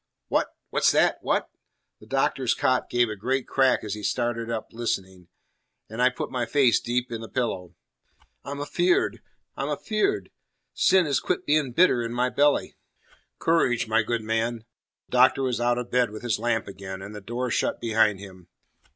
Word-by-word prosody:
"What? - - +2 0.2
What's - - +3
that? - - +3
What?" - - -1 0.5
The 105 - -16
Doctor's 135 -1 +1
cot 130 -1 +1
gave 120 0 +2
a 110 - -4
great 130 +6 -2
crack 135 -1 +2
as 105 -2 -4
he 105 - -6
started 115 +1 -1
up 115 -2 -4
listening, 95 -6 -4 0.6
and 110 +2 -3
I 125 - +6
put 125 - -5
my 120 -2 -2
face 130 -2 +4
deep 120 0 -2
in 115 -1 -4
the 115 - -8
pillow. 95 -8 -3 0.7
"I'm 140 +1 -6
afeard! 175 +5 +1 0.3
I'm - - -3
afeard! 395 - -1 0.4
Sin 190 -2 +4
has 140 -3 +1
quit - - -2
being 150 -3 +2
bitter 165 -5 +4
in 115 0 -4
my 125 +1 +1
belly." 145 0 +2 0.6
"Courage, 130 -8 +2
my 110 +1 +3
good 115 0 -2
man." 115 +1 -1 0.4
The - - -35
Doctor 130 +2 +4
was 125 -2 -1
out 120 0 +2
of 125 -1 -5
bed 125 -1 +2
with 110 +3 -9
his 120 -3 0
lamp 115 -1 0
again, 95 -1 -8
and 100 +2 -8
the 105 - -8
door 120 +4 -3
shut - - 0
behind 110 -3 +2
him. 95 -3 -12
120 Hz, 180 wpm, -25 LUFS, 110-130 Hz, 0.7 s, I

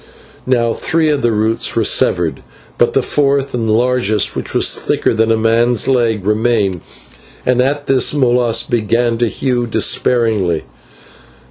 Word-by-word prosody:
Now 120 -3 +1
three 160 -2 -1
of 145 - -1
the 120 - +1
roots 110 +1 -1
were - - +1
severed, - - +1 0.4
but - - +2
the - - +1
fourth 140 -1 0
and 115 -2 -2
largest, 115 -2 0
which - - -5
was - - +3
thicker - - -1
than 110 0 +1
a 115 - +2
man's 115 +1 +1
leg, 115 -6 0
remained, 105 -4 0 0.6
and 125 0 +2
at 145 +2 -1
this 130 -2 +2
Molas 120 -4 +1
began 115 +1 -1
to 120 - +1
hew 120 0 -2
despairingly. 110 -8 0
120 Hz, 145 wpm, -15 LUFS, 110-125 Hz, 0.6 s, was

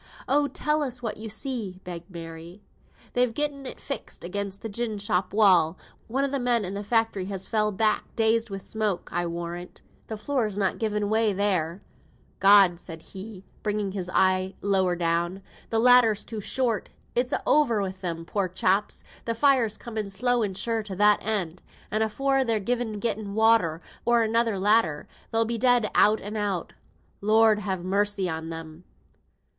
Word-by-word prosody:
"Oh, 290 +1 +3
tell 300 +3 -1
us 250 -3 -4
what 225 - -3
you 220 +1 -6
see?" 220 -5 -3
begged 175 -1 -8
Mary. 170 +2 -9 0.5
"They've 245 -2 +2
gotten 285 -2 -1
it - - -6
fixed - - -5
again 200 +3 -3
the 225 - -5
gin 220 0 -3
shop 190 -2 -1
wall. 185 -5 +4 0.3
One 265 +4 0
o' - - +1
the 275 0 -2
men 240 -4 +1
i' 185 - -4
th' 200 +1 -4
factory 225 -3 0
has 195 -1 -4
fell 215 -1 +1
back; 215 +1 0
dazed 225 0 +2
wi' 195 - -4
the 195 - -12
smoke, 215 -4 -2
I'll 175 0 -1
warrant. 170 +1 -6 0.2
The 220 - -5
floor's 215 -3 -1
not 195 -2 0
given 210 -2 -1
way 220 0 +2
there. 185 -3 0 0.6
God!" 195 -3 +6
said 165 -2 -9
he, 195 0 -8 0.2
bringing 210 -2 -1
his 185 -2 -4
eye 185 0 +2
lower 190 -3 +1
down, 175 +2 -1 0.3
"th' - - -3
ladder's 230 -2 +5
too 220 -2 -5
short! 230 -1 -1 0.2
It's 245 +1 +1
a' - - -1
over 265 -8 +3
wi' 190 - -2
them, 175 -3 -5
poor 195 +1 -1
chaps. 190 +3 0 0.3
Th' 230 - -1
fire's 255 -6 +3
coming 220 -4 -5
slow 245 +5 +1
and 195 -4 -2
sure 230 0 -1
to 205 -3 -7
that 210 +2 +4
end, 185 -5 -2 0.3
and 215 - 0
afore 270 +5 +1
they've 220 -5 -1
either 240 -3 0
gotten 210 -2 -2
water, 220 -8 +3 0.2
or 235 -1 +3
another 225 -1 +1
ladder, 195 -6 +2 0.2
they'll 225 0 +1
be 230 0 -2
dead 245 -2 +3
out 215 +1 +5
and 205 +2 -7
out. 200 -5 -2 0.5
Lord 215 +1 +4
have 190 -4 -3
mercy 200 0 +1
on 160 -1 -4
them!" 165 +1 -8
210 Hz, 175 wpm, -26 LUFS, 185-230 Hz, 0.6 s, God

